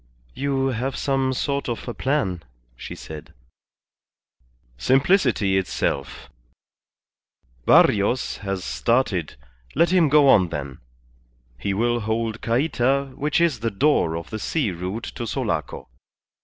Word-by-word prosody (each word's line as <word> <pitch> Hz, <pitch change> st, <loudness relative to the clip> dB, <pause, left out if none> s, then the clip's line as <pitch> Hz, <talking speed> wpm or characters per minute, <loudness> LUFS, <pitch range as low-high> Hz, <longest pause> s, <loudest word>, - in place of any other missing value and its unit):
"You 135 Hz, -1 st, 0 dB
have 130 Hz, +2 st, -2 dB
some 135 Hz, -1 st, 0 dB
sort 140 Hz, +1 st, -2 dB
of 120 Hz, -, -4 dB
a 120 Hz, -, -3 dB
plan," 130 Hz, -, -1 dB, 0.3 s
she -, -, -8 dB
said. 75 Hz, -5 st, -10 dB, 1.4 s
"Simplicity 120 Hz, -, +2 dB
itself. 70 Hz, -9 st, -3 dB, 1.4 s
Barrios 105 Hz, +5 st, +4 dB
has 95 Hz, -3 st, -4 dB
started, 115 Hz, -, 0 dB, 0.4 s
let 170 Hz, +4 st, +3 dB
him 175 Hz, -5 st, +4 dB
go 145 Hz, 0 st, +5 dB
on 95 Hz, -9 st, +5 dB
then; 70 Hz, -4 st, -6 dB, 0.8 s
he 95 Hz, +11 st, -3 dB
will 120 Hz, +3 st, +1 dB
hold 110 Hz, 0 st, -2 dB
Cayta, 135 Hz, +2 st, 0 dB
which 150 Hz, +3 st, 0 dB
is 165 Hz, -8 st, +2 dB
the 115 Hz, +1 st, -1 dB
door 100 Hz, -, +2 dB
of 85 Hz, -, -8 dB
the 110 Hz, -, -4 dB
sea 135 Hz, -3 st, -1 dB
route 90 Hz, +6 st, -5 dB
to 120 Hz, -, -5 dB
Sulaco. -, -, -3 dB
120 Hz, 120 wpm, -23 LUFS, 95-135 Hz, 1.4 s, go